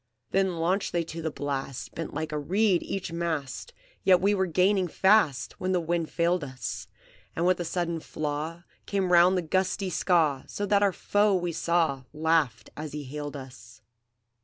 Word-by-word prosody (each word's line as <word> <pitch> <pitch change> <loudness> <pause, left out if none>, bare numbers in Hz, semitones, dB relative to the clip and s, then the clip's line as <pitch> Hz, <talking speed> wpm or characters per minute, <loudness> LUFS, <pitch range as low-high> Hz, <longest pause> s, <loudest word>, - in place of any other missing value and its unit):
"Then 190 -2 +1
launched 180 +5 0
they 170 -1 +1
to 165 0 -7
the 160 - -1
blast, 140 -3 -4
Bent 165 - -5
like 155 +1 -4
a 150 - -1
reed 190 +4 +2
each 190 -3 -4
mast, 165 - -3 0.3
Yet 185 -2 +6
we 200 +3 +3
were 190 -2 +1
gaining 185 +2 +2
fast, 190 -6 +3
When 185 0 0
the 180 - +3
wind 170 -1 -1
failed 170 0 +1
us; 115 -9 -5 0.5
And 170 - 0
with 180 0 +3
a - - -1
sudden 170 -1 -2
flaw 155 +2 -4 0.2
Came 195 -3 0
round 180 +2 +6
the 180 - 0
gusty 185 +3 0
Skaw, 160 -6 +2
So 205 - -3
that 200 0 +3
our 200 -1 +4
foe 205 +2 +2
we 175 -1 -1
saw 165 -5 0
Laugh 155 -6 +1
as 150 -1 -6
he 150 -1 -4
hailed 145 +2 -6
us. 125 -4 -12
170 Hz, 180 wpm, -27 LUFS, 150-185 Hz, 0.5 s, Yet